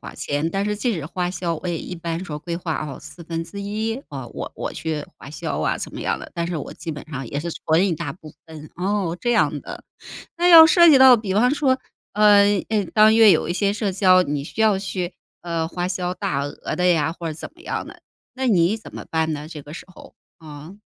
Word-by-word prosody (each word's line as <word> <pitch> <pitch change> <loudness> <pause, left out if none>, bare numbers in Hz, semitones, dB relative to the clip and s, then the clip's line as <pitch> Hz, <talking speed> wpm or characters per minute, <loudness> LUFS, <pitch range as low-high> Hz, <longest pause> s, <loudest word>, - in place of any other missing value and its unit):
花 - - -9
钱， 145 +3 -2
但 195 +3 -1
是 210 0 -1
即 235 +3 -1
使 160 -6 -4
花 180 +1 -3
销， 170 -2 -2
我 180 - -3
也 170 -2 -2
一 180 - -7
般 170 0 -4
说 150 -4 -6
规 170 +3 -5
划 165 -3 -3
哦 140 -3 -7
1/4， 200 - -5
我 135 -4 -7
我 - - -4
去 155 -2 -4
花 - - -12
销 150 - -4
啊 - - 0
怎 - - -7
么 - - -6
样 - - -1
的， - - -11
但 170 - -2
是 175 - -3
我 145 - -6
基 165 - -6
本 150 +1 -8
上 135 -4 -5
也 145 - -3
是 170 +3 -4
存 165 +5 +1
一 180 - 0
大 - - -5
部 155 -4 -14
分。 155 -2 -11
哦， 185 -2 -1
这 240 - 0
样 240 - +2
的。 - - -9 0.5
那 350 +1 +2
要 325 -2 +11
涉 340 +1 +6
及 280 -4 +7
到， 260 -2 +8
比 210 -4 -4
方 245 +7 +3
说， 270 -3 +1 0.4
呃， 210 -1 +6 0.3
诶， 210 -3 +1
当 215 0 +6
月 225 -2 +7
有 165 -2 +2
一 - - 0
些 200 +2 0
社 205 -2 -2
交， 185 -1 +4
你 145 -1 -3
需 215 - -7
要 215 -3 +4
去， 185 -2 -4 0.3
呃， 165 -2 -2
花 175 0 -3
销 180 -1 -2
大 185 -8 -2
额 145 +1 -5
的 180 - -1
呀， 160 -2 +2
或 170 -1 -6
者 155 - -5
怎 155 - -8
么 340 - -20
样 - - -4
的， - - -13 0.3
那 260 -1 -1
你 185 +1 +3
怎 220 - -13
么 - - -8
办 160 -1 0
呢？ 150 0 -5
这 155 -3 -9
个 145 - -12
时 165 - -9
候， - - -15 0.3
呃。 155 +5 -11
175 Hz, 250 characters per minute, -22 LUFS, 160-210 Hz, 0.5 s, 要